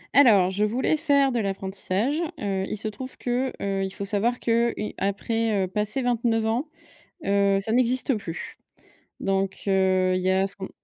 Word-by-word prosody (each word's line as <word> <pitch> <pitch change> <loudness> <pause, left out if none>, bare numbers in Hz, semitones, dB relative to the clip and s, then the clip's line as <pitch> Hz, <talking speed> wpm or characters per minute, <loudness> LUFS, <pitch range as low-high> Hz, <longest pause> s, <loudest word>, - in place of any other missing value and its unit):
Alors, 210 -9 +6
je 200 +2 0
voulais 245 +8 +1
faire 280 -3 +3
de 240 - 0
l'apprentissage, 195 - -2 0.2
heu, 195 -2 -1
il - - -3
se 215 +1 -3
trouve 255 +5 -7
que, 250 +2 -1
heu, 195 -1 -1
il 190 - -2
faut 200 +1 -6
savoir 215 +5 0
que, 235 0 +2
heu, - - -4
i 210 - -4
après, 210 +1 0
heu, 185 - -1
passer 210 +7 +1
29 230 -2 +1
ans, 245 +8 -1 0.6
heu, 200 0 +3
ça 220 - -3
n'existe 255 +2 +3
plus. 170 -4 -7 0.6
Donc 195 0 -1
heu, 185 -1 +2
il 185 - -2
y 185 - +2
a 190 +1 +2
ce 195 - -6
qu'on 190 -1 -7
210 Hz, 190 wpm, -25 LUFS, 195-240 Hz, 0.6 s, Alors